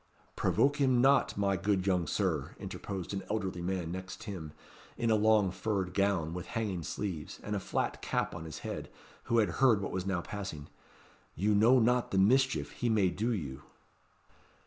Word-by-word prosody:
"Provoke 145 +1 +2
him 130 -4 +3
not, 135 -2 +4
my 100 -1 +2
good 95 -1 0
young 90 -4 +1
Sir," - - -1
interposed 95 -2 -5
an 95 - -2
elderly 95 -4 -2
man, 90 -2 -2
next 95 +4 -7
him, 90 -8 -6 0.5
in 115 -1 +1
a - - +5
long 105 -2 +4
furred 95 -1 -2
gown, 95 -5 +1
with 90 -1 -5
hanging 105 -6 -2
sleeves, 85 -1 -5
and 105 - -3
a - - 0
flat - - -2
cap - - -1
on 80 -1 -7
his 80 - -7
head, - - -5 0.4
who 115 - +1
had 105 -5 +4
heard 120 -6 +6
what 100 - -4
was 95 0 -3
now 95 -3 0
passing. 95 -8 -6 0.7
"You 105 +5 +2
know 115 +5 +6
not 125 +1 +3
the 95 - -1
mischief 130 +7 +3
he 120 - -2
may 105 -4 +3
do 110 +7 -1
you." 75 - -4
100 Hz, 180 wpm, -31 LUFS, 90-110 Hz, 0.7 s, heard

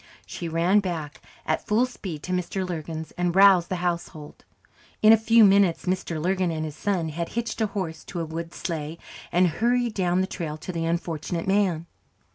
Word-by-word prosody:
She 170 - -6
ran 170 +5 +3
back 165 -7 -4 0.2
at 155 - -1
full 220 +4 +3
speed 185 -11 -7
to 185 - -5
Mr. 180 +1 -2
Lurgan's, 160 -2 -5
and 175 0 0
roused 195 -3 +6
the 185 - -1
household. 170 -3 -4 0.6
In 215 +1 +9
a - - +9
few 225 +1 +5
minutes 195 -3 +4
Mr. 180 -3 -2
Lurgan 185 +2 0
and 155 -1 -2
his 150 -2 -6
son 180 -3 -1
had 165 +2 -4
hitched 230 -1 -2
a 220 - +2
horse 185 -5 -5
to 175 - -6
a 165 - -2
wood 165 +1 -6
sleigh, 160 -3 -4 0.3
and 180 +1 +4
hurried 235 +7 +1
down 180 -2 +1
the - - +1
trail 160 -5 -5
to 170 +3 -6
the 165 -2 -2
unfortunate 165 0 -2
man. 190 -5 +1
175 Hz, 190 wpm, -25 LUFS, 165-195 Hz, 0.6 s, In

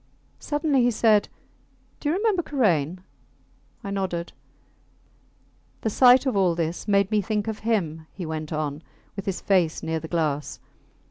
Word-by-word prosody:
Suddenly 295 -3 +1
he 245 - +4
said 215 -2 +3 0.7
Do 290 - -2
you 320 - +1
remember 405 -2 +1
Karain? 180 - 0 0.8
I 200 - -5
nodded. 185 -3 -3 1.5
The 220 - -1
sight 250 +3 +6
of 260 - 0
all 185 -4 +3
this 170 +4 -3
made 200 0 +2
me 210 -1 +3
think 210 +1 -2
of 220 -1 -3
him, 165 -8 -1
he 185 - -7
went 155 0 -5
on, 155 -1 -3 0.3
with 195 0 -6
his 190 - -2
face 180 -5 +1
near 160 0 -1
the 160 - -8
glass 155 -4 -2
195 Hz, 150 wpm, -25 LUFS, 160-225 Hz, 1.5 s, sight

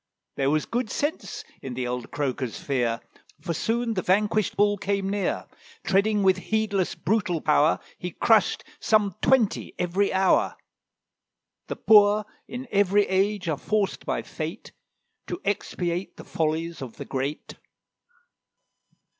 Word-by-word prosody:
There 135 0 +1
was 155 +1 +1
good 240 -1 -2
sense 290 +7 -3 0.2
in 130 -2 -6
the 125 0 -2
old 125 0 -4
croaker's 130 -4 -2
fear, 120 -4 -1 0.4
For 170 - -3
soon 230 +7 0
the 185 - -1
vanquished 210 +2 +1
Bull 205 0 +4
came 195 0 -1
near: 200 0 -1 0.4
Treading 205 +2 +2
with 190 -1 +4
heedless, 215 -4 0
brutal 195 -5 0
power, 150 +1 +3 0.2
He 180 - -4
crushed 215 +4 +3 0.2
some 210 -3 +2
twenty 250 -6 +2
every 185 +3 +1
hour. 190 0 +3 1.1
The - - -3
poor 210 -1 +5 0.2
in 250 +2 -6
every 205 0 +3
age 195 0 +1
are 155 -4 -1
forced 210 -2 -1
by - - -1
Fate - - -6 0.6
To 355 - -4
expiate 180 -3 -2
the - - -9
follies 165 +1 -2
of 125 -4 -8
the - - -6
great. 135 +3 -4
195 Hz, 135 wpm, -26 LUFS, 160-210 Hz, 1.1 s, poor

